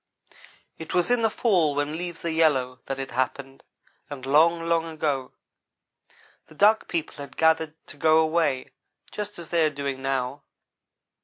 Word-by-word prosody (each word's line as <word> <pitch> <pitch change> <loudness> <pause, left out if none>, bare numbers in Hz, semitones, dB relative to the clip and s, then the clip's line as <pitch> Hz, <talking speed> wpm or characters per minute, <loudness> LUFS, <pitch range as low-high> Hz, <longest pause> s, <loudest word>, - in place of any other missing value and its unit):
"It 160 - -6
was 180 +6 +2
in 245 -1 +3
the 225 - +3
fall 180 -10 +2
when 145 +2 -1
leaves 175 0 -6
are - - 0
yellow 140 -6 +1
that 135 - -3
it 135 -1 -5
happened, 135 +2 -3 0.5
and 135 -3 -7
long, 165 +4 +4
long 165 -1 +1
ago. 150 -5 -2 1.2
The 155 - -17
Duck 215 +5 +4
people 165 -3 -3
had 140 -2 -10
gathered 160 -1 +2
to 145 - -12
go 155 +2 +4
away, 160 -5 +1 0.4
just 210 0 -5
as 170 -2 -9
they 170 -2 +3
are 155 - +3
doing 140 -2 -4
now. 135 +1 -2
155 Hz, 160 wpm, -25 LUFS, 135-170 Hz, 1.2 s, long